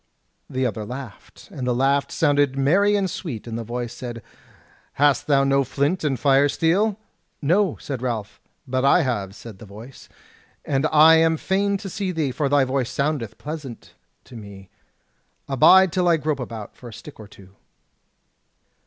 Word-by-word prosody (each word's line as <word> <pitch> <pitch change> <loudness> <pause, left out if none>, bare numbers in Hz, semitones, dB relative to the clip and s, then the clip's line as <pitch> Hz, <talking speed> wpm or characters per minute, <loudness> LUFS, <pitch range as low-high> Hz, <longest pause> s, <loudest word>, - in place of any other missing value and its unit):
The 130 0 -1
other 110 -3 -3
laughed, 125 -1 -10
and 125 -2 -5
the 125 - +1
laugh 135 +2 +1
sounded 145 -3 +1
merry 195 +10 +3
and 200 -2 +1
sweet, 155 - -6
and 115 -1 -6
the 115 - -4
voice 120 +1 -5
said: 120 -2 -8 0.7
"Hast 145 -2 +2
thou 140 -2 +3
no 135 0 +2
flint 145 +7 -1
and 135 -5 -1
fire 140 +1 +3
steel?" 195 +8 +1 0.4
"No," 175 +3 +1
said 135 -4 -6
Ralph. 110 -5 -4 0.3
"But 130 0 -1
I 140 +5 +4
have," 100 -7 -3
said 110 -4 -11
the 110 - -12
voice, 110 +7 -13 0.6
"and 140 +2 0
I 160 +1 +7
am 160 0 +3
fain 200 +3 0
to 200 0 -8
see 195 0 -3
thee, 155 -6 -1
for 140 +2 -1
thy 145 -1 +4
voice 130 -1 -1
soundeth 140 -6 -2
pleasant 145 -5 -8 0.3
to 125 - -15
me. 100 -3 -11 0.8
Abide 175 +7 +5
till 180 -1 +1
I 170 -1 +4
grope 150 -2 -2
about 115 -4 -7
for 120 - -11
a - - -12
stick 145 +5 -12
or 110 - -10
two." 95 -2 -17
135 Hz, 170 wpm, -22 LUFS, 120-160 Hz, 0.8 s, I